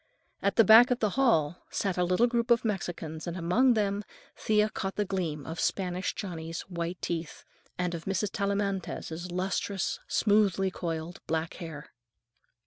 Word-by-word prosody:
At 200 - +1
the 225 - +7
back 225 +4 +8
of 250 - +2
the 215 -4 0
hall 180 - +2
sat 195 -3 -1
a 180 - +1
little 185 +6 +3
group 235 -1 0
of 235 -1 +4
Mexicans, 170 -6 -3
and 170 +1 -3
among 225 +9 +3
them 205 -1 0 0.3
Thea 215 0 +2
caught 195 0 -4
the 210 - 0
gleam 170 -7 -3
of 160 +1 -6
Spanish 185 -1 -1
Johnny's 165 -4 -5
white 175 -1 -5
teeth, 165 -2 -4 0.3
and 180 -1 -1
of 165 -1 -6
Mrs. 195 +1 -1
Tellamantez's 195 -4 -2
lustrous, 190 +1 -2
smoothly 200 -3 +2
coiled 165 -1 -4
black 160 0 -1
hair. 155 -3 -8
185 Hz, 155 wpm, -29 LUFS, 170-210 Hz, 0.3 s, back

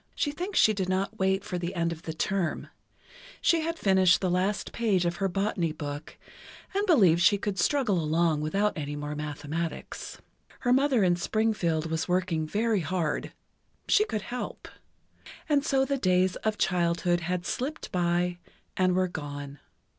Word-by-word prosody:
She 290 - 0
thinks 360 +6 -4
she 215 - +6
did 190 -2 -2
not 195 +4 -1
wait 190 +1 +1
for 180 -3 -4
the 175 +1 -4
end 170 -1 0
of 165 -1 -6
the 160 - -5
term. 185 0 -1 0.7
She 335 -1 +3
had 330 +1 -2
finished 190 - +4
the 185 -2 0
last 190 +3 0
page 200 -6 +1
of 170 0 -1
her 195 - +1
Botany 190 -3 -1
Book, 145 0 -7 0.6
and 400 +1 +1
believed 190 - +5
she 200 +4 +5
could 200 -1 -3
struggle 215 - +2
along 160 0 +1
without 200 +7 0
any 145 -1 -4
more 145 0 -4
mathematics. 150 +2 -5 0.4
Her 245 -1 +3
mother 265 -4 +3
in 175 -1 +3
Springfield 175 -5 0
was 160 0 -1
working 180 -3 0
very 215 +4 +1
hard—she 180 - -2
could 215 - -3
help. 250 +1 -6 0.8
And 290 -2 +2
so 270 -2 +2
the 275 +1 -1
days 185 -2 +2
of 215 -1 -2
childhood 175 0 +1
had 175 +1 -3
slipped 290 +10 -4
by, 175 0 0 0.4
and 185 -1 +2
were 185 0 +2
gone. 145 -3 -7
185 Hz, 160 wpm, -28 LUFS, 170-215 Hz, 0.8 s, she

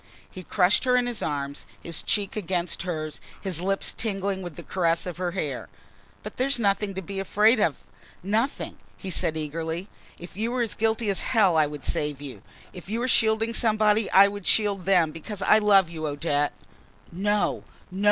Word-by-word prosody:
He 185 - -8
crushed 185 +2 +2
her 250 -1 +3
in 250 - +2
his 240 -3 -3
arms, 140 -1 -3
his 170 -2 -3
cheek 205 -2 -1
against 180 -4 -2
hers, 155 -4 -4 0.2
his 185 -4 -1
lips 195 +2 +1
tingling 195 -3 -2
with 175 -4 -7
the - - -9
caress 170 -3 0
of 180 -2 -5
her 180 -1 -1
hair. 150 -9 -4 0.5
"But - - -8
there 255 - +1
is 275 - +2
nothing 200 -2 0
to 190 - -4
be 195 +2 -5
afraid 210 +4 +3
of, 160 -8 +2 0.5
nothing," 220 +8 -1 0.2
he 190 - -6
said 160 -1 0
eagerly. 160 +4 -4 0.3
"If 175 0 -11
you 220 +4 -1
were 245 0 0
as 225 - -3
guilty 220 0 0
as 195 - 0
hell, 205 -8 +3
I 155 -2 +4
would 145 -1 -8
save 150 -2 -1
you! 135 -8 -8 0.3
If 180 -1 -11
you 225 +2 -1
are - - 0
shielding 225 -1 +2
somebody 215 -1 +2
I 195 +1 +7
would 200 -1 -6
shield 200 -4 +3
them 180 -5 +3
because 185 +6 -6
I 215 - +5
love 200 -3 +5
you, 160 -2 -5
Odette!" 145 0 0 0.6
"No, 205 +4 0 0.3
no!" 190 - -6
190 Hz, 190 wpm, -25 LUFS, 165-210 Hz, 0.6 s, I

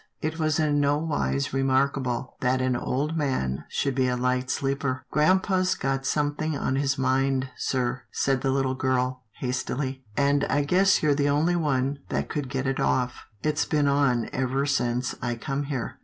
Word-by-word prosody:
It 160 +1 -3
was 155 -1 +1
in 150 -2 +2
no 145 0 +3
wise 70 - -1
remarkable, 135 -2 0
that 130 0 +1
an 130 -1 +1
old 145 +6 -1
man 75 - -1
should 140 -1 0
be 130 0 +1
a 125 0 0
light 125 0 0
sleeper. 135 -2 -1
" - - -42
Grampa's 185 +3 +3
got 135 -2 -1
something 150 +1 0
on 130 - -1
his 135 -1 +1
mind, 135 0 +1
sir," 125 -1 -1
said 135 -2 +1
the 135 - 0
little 135 -1 +1
girl, 130 -1 0 0.2
hastily, 130 +1 -2
" - - -27
and 140 0 +3
I 145 +1 +1
guess 185 +5 +3
you're 150 -1 +4
the 145 0 +1
only 155 +5 +2
one 140 -4 0
that - - -2
could 145 -4 -3
get 135 +1 -2
it 135 0 -1
off. 125 -1 0 0.2
It's 155 0 +1
been 150 -2 +1
on 140 -4 +2
ever 130 +2 0
since 125 -3 0
I 120 -1 -1
come 135 +5 -3
here. 135 -4 -4
135 Hz, 185 wpm, -26 LUFS, 130-145 Hz, 0.2 s, you're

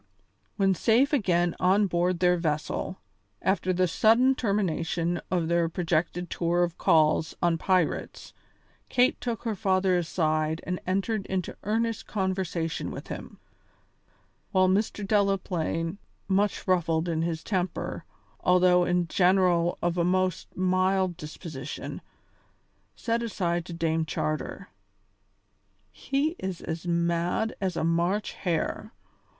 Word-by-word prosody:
When 195 -2 +3
safe 235 - +3
again 175 - +2
on 195 +3 +4
board 180 -1 0
their 180 0 +4
vessel, 160 +3 -2 0.4
after 190 -1 +1
the 185 0 +2
sudden 230 +8 +4
termination 175 -6 -1
of 175 -3 0
their 170 0 +2
projected 175 0 -1
tour 175 +1 +1
of 175 -1 -3
calls 155 0 +3
on 170 -1 +1
pirates, 185 -3 -1 0.6
Kate 250 +1 +2
took 235 -2 -3
her 225 -2 -1
father 190 -1 +2
aside 160 -2 0
and 180 0 -2
entered 195 +2 -1
into 185 -2 -3
earnest 225 +1 -1
conversation 185 -5 -2
with - - -8
him, - - -7 1.1
while 185 -2 +4
Mr. 205 +2 0
Delaplaine, 190 -4 0 0.3
much 200 +1 0
ruffled 165 -2 +1
in 165 -2 0
his 165 -1 -2
temper, 175 -4 -2 0.4
although 180 0 +4
in 180 -1 +1
general 180 -1 +3
of 175 0 0
a - - +3
most 185 0 0
mild 185 0 +2
disposition, 150 -2 -7 0.9
said 230 0 -1
aside 175 -7 -1
to 175 - -7
Dame 165 -1 0
Charter: 155 0 -3 1.2
"He 275 +3 -1
is 190 -2 -4
as 165 +2 -5
mad 170 +5 0
as 185 -3 -1
a - - 0
March 170 +5 +1
hare. 170 -4 -2
180 Hz, 120 wpm, -27 LUFS, 170-195 Hz, 1.2 s, on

